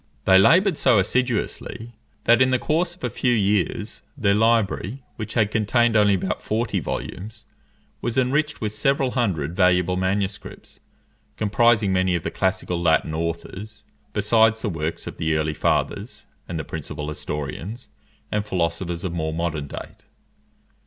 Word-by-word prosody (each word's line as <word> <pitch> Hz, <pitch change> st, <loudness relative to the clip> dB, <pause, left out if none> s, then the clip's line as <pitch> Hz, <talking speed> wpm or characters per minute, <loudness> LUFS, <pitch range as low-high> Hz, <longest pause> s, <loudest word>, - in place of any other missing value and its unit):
They 95 Hz, 0 st, +7 dB
laboured 180 Hz, -, +4 dB
so 115 Hz, -, +4 dB
assiduously, 115 Hz, +1 st, -1 dB, 0.3 s
that, 120 Hz, +1 st, +5 dB
in 130 Hz, -, +5 dB
the 130 Hz, -, +3 dB
course 160 Hz, +7 st, 0 dB
of -, -, -23 dB
a 125 Hz, -, 0 dB
few 125 Hz, +3 st, +1 dB
years, 105 Hz, 0 st, 0 dB, 0.2 s
their 100 Hz, -6 st, +2 dB
library, 115 Hz, +2 st, +1 dB
which 110 Hz, -1 st, -6 dB
had 105 Hz, -3 st, +2 dB
contained 115 Hz, +2 st, +2 dB
only 105 Hz, -2 st, +5 dB
about 95 Hz, 0 st, -2 dB
forty 110 Hz, -2 st, -1 dB
volumes, 95 Hz, +7 st, -6 dB, 0.6 s
was 120 Hz, +1 st, -2 dB
enriched 145 Hz, +4 st, +1 dB
with 105 Hz, -2 st, -1 dB
several 135 Hz, +4 st, +1 dB
hundred 90 Hz, -, -1 dB
valuable 90 Hz, -1 st, +3 dB
manuscripts, 95 Hz, +1 st, -3 dB, 0.6 s
comprising 110 Hz, -1 st, +3 dB
many 95 Hz, -1 st, +2 dB
of 85 Hz, -, -2 dB
the -, -, -3 dB
classical 95 Hz, -2 st, -1 dB
Latin 80 Hz, -2 st, +2 dB
authors, 95 Hz, +6 st, -5 dB, 0.3 s
besides 110 Hz, +1 st, +3 dB
the 110 Hz, -, 0 dB
works 80 Hz, -2 st, -4 dB
of -, -, -7 dB
the 80 Hz, 0 st, 0 dB
early 75 Hz, 0 st, 0 dB
fathers, -, -, -1 dB, 0.2 s
and 85 Hz, -, -4 dB
the 80 Hz, -, -3 dB
principal 75 Hz, -1 st, -6 dB
historians, 75 Hz, -, -6 dB, 0.4 s
and 105 Hz, 0 st, 0 dB
philosophers 85 Hz, -2 st, -2 dB
of 90 Hz, -3 st, -3 dB
more 80 Hz, -2 st, -2 dB
modern 80 Hz, -3 st, -2 dB
date. -, -, -9 dB
100 Hz, 150 wpm, -23 LUFS, 85-115 Hz, 0.6 s, They